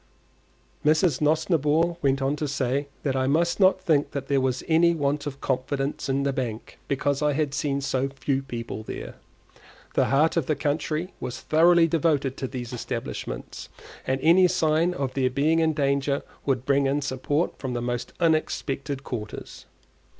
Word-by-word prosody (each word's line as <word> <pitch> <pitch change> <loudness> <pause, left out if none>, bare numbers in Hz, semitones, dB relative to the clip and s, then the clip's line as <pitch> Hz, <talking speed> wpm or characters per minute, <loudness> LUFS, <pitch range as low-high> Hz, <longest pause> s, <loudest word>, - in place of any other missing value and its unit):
Mrs. 155 -1 +3
Nosnibor 160 +1 +2
went 135 -1 +1
on 135 +2 +1
to 150 - -2
say 140 0 -1 0.2
that 135 -3 0
I 130 0 +1
must 170 +7 +1
not 190 -1 +5
think 155 -6 +1
there 140 0 0
was 130 -1 -1
any 170 +1 +4
want 145 -1 -1
of 140 -1 -7
confidence 135 +2 -2
in 135 +1 +1
the 140 -1 0
bank 120 -5 -5
because 140 +1 0
I 150 -1 +2
had 145 -1 -1
seen 140 -1 -1
so 135 0 -1
few 135 0 -1
people 120 -4 -6
there; 60 -12 -7 0.8
the - - +3
heart 155 +5 +2
of 160 - 0
the 155 - +1
country 155 +4 -2
was 125 -1 -5
thoroughly 170 +2 +5
devoted 150 -5 +1
to 130 - -3
these 125 -1 -6
establishments, 120 - -5 0.4
and 130 0 +1
any 180 +3 +6
sign 165 +1 +1
of 135 -4 -2
their 130 -1 +1
being 150 +5 +2
in 160 -1 +2
danger 140 -1 0 0.2
would 130 -2 0
bring 140 0 +3
in 140 +1 0
support 145 +4 -1
from 130 -2 -4
the - - -1
most 120 0 -3
unexpected 145 -4 0
quarters. 110 -6 -7
140 Hz, 165 wpm, -25 LUFS, 135-155 Hz, 0.8 s, any